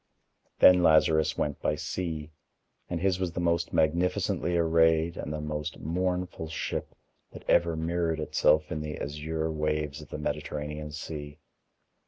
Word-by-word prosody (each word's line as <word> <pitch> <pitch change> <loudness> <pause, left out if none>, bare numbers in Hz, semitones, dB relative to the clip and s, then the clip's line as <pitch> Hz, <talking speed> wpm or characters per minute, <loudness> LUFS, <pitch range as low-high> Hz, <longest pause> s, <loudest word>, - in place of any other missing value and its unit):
Then 90 -1 +7
Lazarus 80 -1 +4
went 75 -1 -2
by 75 - +1
sea. 80 0 -4 0.6
And 90 - -2
his 95 +1 +1
was 90 -3 -2
the - - -3
most 85 -1 +1
magnificently 85 +2 +1
arrayed 80 0 +3
and - - -5
the 75 - -3
most 75 0 -4
mournful 90 0 -2
ship 80 - -4 0.4
that - - -11
ever 85 -1 +3
mirrored 80 0 -1
itself 75 0 +2
in 75 - -2
the 75 0 -5
azure 80 +2 -3
waves 75 -1 -2
of 75 - -13
the - - -5
Mediterranean 75 0 -4
Sea. 75 -2 -7
80 Hz, 145 wpm, -28 LUFS, 75-85 Hz, 0.6 s, Then